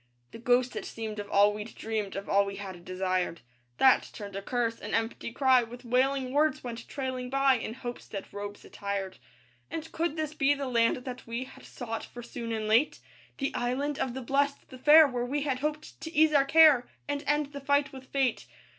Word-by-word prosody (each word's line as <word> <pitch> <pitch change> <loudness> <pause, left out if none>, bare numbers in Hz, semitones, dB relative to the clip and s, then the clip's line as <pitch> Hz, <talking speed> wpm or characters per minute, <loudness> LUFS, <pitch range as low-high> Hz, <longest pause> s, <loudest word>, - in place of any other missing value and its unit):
The - - -10
ghost 245 +1 +2
it - - -4
seemed 220 -2 -5
of 205 0 -6
all 205 +1 +5
we'd 210 +2 -7
dreamed, 215 -3 -3
Of 195 0 -5
all 200 0 +4
we 200 0 -5
had 190 -3 -8
desired; 185 -1 -1 0.4
That 265 -1 +5
turned 200 -2 -8
a 195 - -3
curse, 230 +1 -1
an - - -3
empty 225 +1 -2
cry 260 -1 +4
With 240 +2 -9
wailing 260 +2 +1
words 300 0 +2
went 235 -2 -6
trailing 260 -2 -4
by 275 0 +4
In 230 -2 -3
hope's 245 -2 -7
dead 195 -2 -5
robes 205 0 -7
attired. 200 -1 -4 0.5
And 320 0 -6
could 330 -1 -1
this 310 -2 -3
be 290 -1 +3
the 280 -1 -4
land 235 -2 +3
that 255 -2 -7
we 235 +2 -3
Had 260 - -14
sought 225 -3 -5
for 240 - -10
soon 235 0 -6
and 220 -1 -2
late? 230 +8 +3 0.4
That 275 - -2
Island 270 +4 -1
of 250 -2 -2
the 265 - -5
Blest, 280 +3 0
the 255 - -11
fair, 310 +4 +8
Where 250 -3 -2
we 280 +4 -1
had 270 -3 -1
hoped 300 +2 -4
to 320 - -6
ease 315 -1 +4
our 280 -2 +5
care 300 -4 +6 0.2
And 285 0 -2
end 295 0 +1
the 280 - -6
fight 285 0 +1
with 265 -1 -10
fate. 265 -4 0
250 Hz, 210 wpm, -29 LUFS, 225-280 Hz, 0.5 s, fair